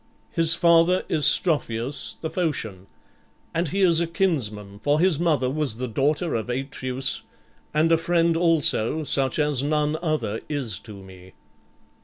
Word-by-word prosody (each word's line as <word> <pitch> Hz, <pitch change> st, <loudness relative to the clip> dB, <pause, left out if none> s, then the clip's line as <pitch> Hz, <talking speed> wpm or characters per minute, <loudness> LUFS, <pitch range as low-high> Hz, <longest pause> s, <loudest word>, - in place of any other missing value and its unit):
"His 165 Hz, -2 st, +2 dB
father 170 Hz, +1 st, +3 dB
is 150 Hz, -, +1 dB
Strophius 140 Hz, -6 st, +1 dB
the 160 Hz, -, -5 dB
Phocian; 110 Hz, -, -3 dB, 0.7 s
and 165 Hz, +1 st, -1 dB
he 195 Hz, +7 st, -2 dB
is 170 Hz, -3 st, +5 dB
a 170 Hz, -, -1 dB
kinsman, 110 Hz, -, -1 dB
for 145 Hz, +1 st, +1 dB
his 175 Hz, -3 st, +2 dB
mother 155 Hz, -7 st, +1 dB
was 140 Hz, -3 st, -1 dB
the 125 Hz, +2 st, -4 dB
daughter 145 Hz, +8 st, -1 dB
of 115 Hz, +1 st, -3 dB
Atreus 130 Hz, 0 st, -2 dB, 0.5 s
and 155 Hz, +2 st, +1 dB
a 165 Hz, -, +5 dB
friend 170 Hz, 0 st, +1 dB
also 160 Hz, -4 st, +2 dB
such 135 Hz, -3 st, 0 dB
as 150 Hz, -4 st, +1 dB
none 150 Hz, +1 st, 0 dB
other 155 Hz, -10 st, -2 dB
is 130 Hz, -, -3 dB
to 100 Hz, -4 st, -12 dB
me." 95 Hz, -1 st, -15 dB
150 Hz, 150 wpm, -23 LUFS, 125-165 Hz, 0.7 s, is